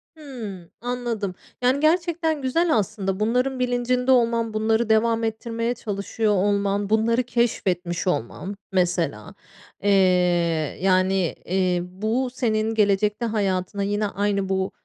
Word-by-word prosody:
Hıı, 225 - -8
anladım. 235 -6 -3 0.3
Yani, 255 +3 +2
gerçekten 325 -1 +1
güzel 315 +6 +2
aslında. 195 -2 -2
Bunların 250 +4 0
bilincinde 250 +1 +1
olman, 230 -2 +2
bunları 220 +1 +1
devam 225 +1 +3
ettirmeye 230 +1 -2
çalışıyor 210 -1 -2
olman, 200 0 +1
bunları 230 +3 +2
keşfetmiş 185 -8 -1
olman 180 - -2 0.2
mesela. 180 -2 -1 0.5
Eee, 205 - +3 0.9
yani, 185 -1 +2
eee, 185 -1 +1
bu 215 +8 -2
senin 225 -3 0
gelecekte 210 +2 +2
hayatına 200 -3 -1
yine 205 +1 0
aynı 200 -1 -1
bu 190 0 0
215 Hz, 115 wpm, -23 LUFS, 195-245 Hz, 0.9 s, devam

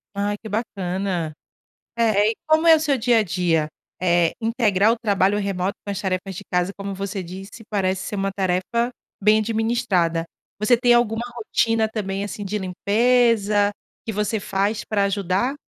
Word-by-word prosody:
Ai, 205 +1 -1
que 220 - -8
bacana. 190 -6 -2 0.6
Eh, 215 -2 +3
e - - -7
como 315 +1 +3
é 325 - +9
o - - +1
seu 290 -4 +1
dia 235 -1 +3
a - - +2
dia? 170 -4 0 0.3
Eh, 175 -2 +3
integrar 225 -3 +2
o 235 - 0
trabalho 200 -2 +2
remoto 195 -1 -2
com 200 - -3
as 195 - -4
tarefas 190 -1 -2
de 205 - -7
casa, 180 +2 +1
como 200 0 -5
você 195 0 -4
disse, 195 +6 -10
parece 190 -2 0
ser 210 - -4
uma 195 0 -1
tarefa 195 +6 0 0.3
bem 215 +2 +5
administrada. 215 -7 0 0.4
Você 215 +3 +4
tem 240 0 +4
alguma 235 -1 +2
rotina 225 -1 +1
também, 200 -3 -3
assim, 205 0 -5
de 205 +2 -2
limpeza, 210 +1 +2 0.3
que 220 - -2
você 210 +1 -1
faz 200 +3 -1
para 205 -2 0
ajudar? 200 +5 0
205 Hz, 170 wpm, -22 LUFS, 190-225 Hz, 0.6 s, é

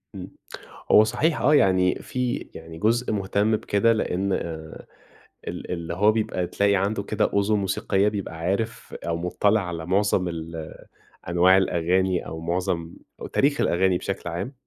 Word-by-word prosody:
إمم. 95 -1 -8 0.6
هو 105 - +8
صحيح 135 +9 0
آه، 150 +4 +4
يعني 95 -7 +4
في 125 0 -2 0.2
يعني 80 0 -10
جزء 115 +5 +1
مهتم 105 +2 +1
بكده، 105 +3 +2
لإن 100 -3 -1
آآ، 80 -3 -5 0.6
ال - - -6
اللي 85 -1 -4
هو 105 +4 +4
بيبقى 105 -5 -1
تلاقي 100 +2 +2
عنده 100 +2 0
كده 105 +1 0
أذن 100 +1 +2
موسيقية 95 0 0
بيبقى 100 -5 -3
عارف، 100 +7 -3
أو 85 0 0
مُطّلع 100 +5 +1
على 85 -2 -5
معظم 95 0 +1
ال 80 -1 -6 0.6
أنواع 90 +2 +5
الأغاني، 90 0 +1
أو 80 - -6
معظم 85 0 -2 0.3
أو - - -5
تاريخ 145 +2 +1
الأغاني 90 +1 +2
بشكل 95 -1 -4
عام. 90 - -4
95 Hz, 150 wpm, -24 LUFS, 85-105 Hz, 0.6 s, هو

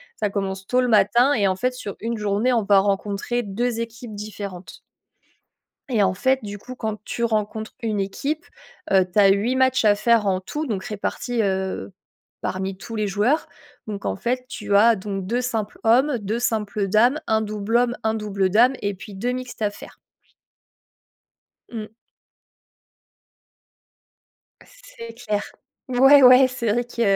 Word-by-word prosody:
ça 210 - -1
commence 195 -1 -4
tôt 250 - +2
le 250 - +2
matin 235 +5 +4
et, 205 -7 +2
en 185 - +1
fait, 250 +5 0
sur 210 -5 -7
une 230 +1 -3
journée, 210 +4 0
on 230 - +2
va 200 -1 +5
rencontrer 205 +4 -1
2 230 +3 -2
équipes 230 -1 -7
différentes 200 -3 -8 1.1
et 220 -5 +2
en 185 -1 +2
fait, 260 +6 +1
du 205 0 -6
coup, 255 +5 -10
quand 220 -3 -4
tu 235 - -4
rencontres 220 -1 -2
une 215 -3 -1
équipe, 285 - -3 0.5
heu, 190 -1 +5
tu 210 - +2
as 200 - +7
8 210 +6 +2
matchs 260 -2 +2
à 205 -1 +5
faire 225 -1 +2
en 185 -1 +1
tout, 300 +10 -4
donc 195 -5 -3
répartis, 225 +3 -3
heu, 190 - -2 0.5
parmi 190 0 -3
tous 225 +3 -8
les 215 -1 -1
joueurs. 210 +10 +1 0.4
Donc, 205 -2 -6
en - - -1
fait, 250 +4 -2
tu 205 -4 -2
as 230 +3 +6
donc 195 -1 -5
2 240 +3 0
simples 225 -4 -3
hommes, 250 +4 +3
2 215 +3 -3
simples 215 -4 -1
dames, 235 +9 +3
un 220 0 +2
double 215 +2 -1
homme, 245 0 +1
un 220 0 +1
double 200 -3 -1
dame 235 +7 +4
et 200 0 -1
puis 200 +1 -11
2 240 +6 -2
mixtes 250 -2 -6
à 210 - +2
faire. - - -13 1.8
Mmh. 220 -3 -5 2.8
C'est - - -12
clair. 210 -3 -3 0.4
Ouais, 270 +3 +6
ouais! 255 +1 +8
C'est 235 -3 -2
vrai 240 +2 0
que 240 -1 -6
220 Hz, 165 wpm, -22 LUFS, 200-245 Hz, 2.8 s, ouais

